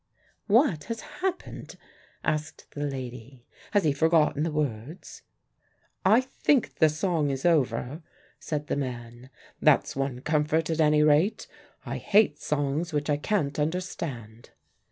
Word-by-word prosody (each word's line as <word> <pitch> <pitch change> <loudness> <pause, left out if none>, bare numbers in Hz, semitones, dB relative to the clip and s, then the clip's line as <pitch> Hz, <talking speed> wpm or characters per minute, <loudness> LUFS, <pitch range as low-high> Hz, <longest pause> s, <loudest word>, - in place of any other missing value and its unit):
"What 210 - +3
has 230 0 -5 0.2
happened?" 370 -1 -4 0.5
asked 155 0 -2
the 145 - -5
lady. 130 -2 -6 0.2
"Has 205 - +2
he 150 -3 +2
forgotten 155 -1 +2
the 165 - +1
words?" 150 - -4 0.8
"I 215 +6 +5
think 265 0 0
the 160 - +6
song 155 -1 0
is 135 +1 -3
over," 140 -2 +1 0.4
said 150 -1 -3
the - - -2
man. 120 -2 -6 0.3
"That's - - +3
one 135 -2 -2
comfort 155 +2 +1
at 160 0 +1
any 150 0 +4
rate. 155 +8 +3 0.4
I - - -4
hate 200 -8 +3
songs 150 +3 -1
which 150 0 0
I 145 - +2
can't 150 -4 -1
understand." 150 - -4
150 Hz, 135 wpm, -27 LUFS, 135-170 Hz, 0.8 s, the